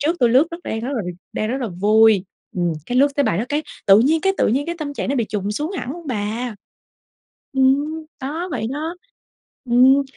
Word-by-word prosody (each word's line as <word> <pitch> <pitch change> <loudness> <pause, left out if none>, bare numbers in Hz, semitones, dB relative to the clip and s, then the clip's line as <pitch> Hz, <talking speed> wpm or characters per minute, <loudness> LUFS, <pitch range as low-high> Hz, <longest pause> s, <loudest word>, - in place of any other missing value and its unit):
trước 320 +4 +1
tui 240 - +5
lướt 260 +7 +5
rất 335 - -6
đang 220 - -3
rất 240 - -4
là 220 - -1 0.3
đang 215 - -2
rất 260 - -1
là 235 - -2
vui, 210 +2 +4 0.3
ừm, 175 -1 +1
cái 250 +1 0
lướt 280 - +6
tới 285 - +3
bài 170 - +1
đó 220 - 0
cái 295 +2 0 0.2
tự 195 +1 +8
nhiên 310 +6 +3
cái 385 +2 +2
tự - - +3
nhiên 270 +6 0
cái 340 - -2
tâm 285 -2 -4
trạng - - -3
nó 275 - +1
bị 235 - +1
chùng 205 0 -2
xuống 300 - -3
hẳn 250 - -4
luôn 340 -2 -10
bà. 225 0 -3 1.0
Ừm, 285 +4 +2 0.2
đó 315 +7 -3
vậy 225 -4 -2
đó. 320 +4 -4 0.7
Ừm. 260 +3 +6
260 Hz, 225 wpm, -21 LUFS, 220-295 Hz, 1.0 s, tự